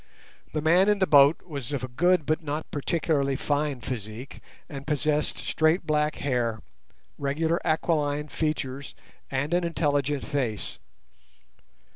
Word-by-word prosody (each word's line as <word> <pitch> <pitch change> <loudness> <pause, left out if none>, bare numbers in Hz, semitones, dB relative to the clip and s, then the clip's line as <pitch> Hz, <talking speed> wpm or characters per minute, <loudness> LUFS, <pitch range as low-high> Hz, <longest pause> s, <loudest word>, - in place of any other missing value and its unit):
The 155 - -2
man 180 +5 +5
in 210 - +4
the 190 - +3
boat 145 -1 +6
was 140 -8 -6
of 140 -3 -2
a - - -2
good 175 +6 +2
but 155 +4 0
not 155 0 -4
particularly 145 -2 0
fine 145 -1 -1
physique, 115 +1 -6 0.3
and 140 -3 -8
possessed 150 0 0
straight 160 +3 +1
black 150 -1 +1
hair, 120 -5 -1 0.6
regular 160 +4 0
aquiline 150 -2 0
features, 140 -3 -3 0.3
and 140 +4 -1
an 175 0 +2
intelligent 145 -4 0
face. 130 -8 -2
145 Hz, 130 wpm, -26 LUFS, 140-160 Hz, 0.6 s, boat